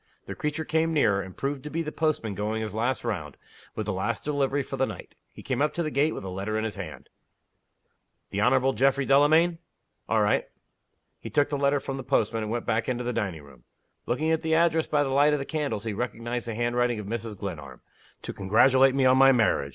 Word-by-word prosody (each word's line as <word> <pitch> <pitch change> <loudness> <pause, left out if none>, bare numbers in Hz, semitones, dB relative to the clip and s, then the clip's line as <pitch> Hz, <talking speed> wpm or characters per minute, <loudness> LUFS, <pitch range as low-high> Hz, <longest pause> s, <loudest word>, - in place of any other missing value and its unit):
The - - -6
creature 150 +1 -3
came 160 0 +1
nearer, 105 -10 +3
and 95 -1 -10
proved 140 0 -3
to 150 - -6
be 165 +2 -2
the 150 - -5
postman 155 -10 -1
going 110 +2 -2
his 105 -2 -5
last 120 +4 -1
round, 85 - -4 0.4
with - - -3
the - - -2
last - - -2
delivery 140 -1 0
for - - -6
the - - +1
night. - - -9 0.2
He - - -13
came - - -2
up 150 0 +1
to 170 - 0
the 155 - -3
gate 145 +3 +1
with - - -6
a 95 - -5
letter 100 +4 -3
in 110 - -1
his 110 -2 -2
hand. 90 -6 -8 1.2
"The 100 - -1
Honorable 130 +3 +3
Geoffrey 135 +3 +2
Delamayn?" 155 +5 +4 0.5
"All - - +3
right." - - +1 0.7
He - - -8
took 145 -1 +2
the 145 - -1
letter 140 0 +2
from 135 0 -5
the 135 - -6
postman, 115 -4 0
and 110 0 -4
went 120 0 -2
back 110 +2 0
into 125 -1 -2
the 125 0 -2
dining 90 -9 -3
room. 65 -4 -17 0.4
Looking 155 +6 0
at 160 - +1
the 160 0 +1
address 165 -1 +2
by 145 -1 +2
the 135 - -2
light 145 +3 +4
of - - +2
the 135 - -4
candles, 145 -10 -3
he 110 -2 -3
recognized 120 +1 -4
the 115 - -4
handwriting 120 0 0
of 105 - -6
Mrs. 110 0 -5
Glenarm. 75 -10 -7 0.4
"To - - -5
congratulate 130 +7 +4
me 135 -1 +2
on 130 0 +5
my 135 0 +8
marriage!" 110 - +2
130 Hz, 230 wpm, -26 LUFS, 110-145 Hz, 1.2 s, my